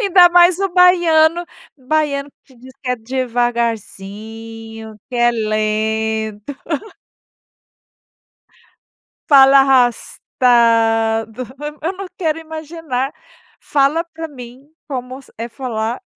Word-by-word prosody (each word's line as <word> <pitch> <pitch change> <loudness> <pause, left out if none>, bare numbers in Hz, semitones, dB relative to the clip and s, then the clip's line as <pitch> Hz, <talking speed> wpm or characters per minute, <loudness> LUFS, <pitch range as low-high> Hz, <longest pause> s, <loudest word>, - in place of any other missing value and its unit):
Ainda 375 -5 +6
mais 350 0 +5
o 390 0 0
baiano 345 -2 +4 0.3
baiano, 285 +1 -1 0.2
que 260 - -22
diz 260 +2 -14
que 255 - -3
é 250 - 0
devagarzinho, 225 -2 -4
que 245 - -6
é 240 0 +4
lento. 220 +1 -2 2.8
Fala 275 -1 +7
arrastado, 230 -3 +2 0.4
eu 345 +5 -2
não 390 +1 -7
quero 325 -3 -1
imaginar 315 -4 -5 0.5
fala 290 +4 +1
para 325 -1 -8
mim 255 0 -12 0.2
como 255 -1 -6 0.2
é 230 +1 -4
falar 230 -2 -4
255 Hz, 95 wpm, -18 LUFS, 225-310 Hz, 2.8 s, Fala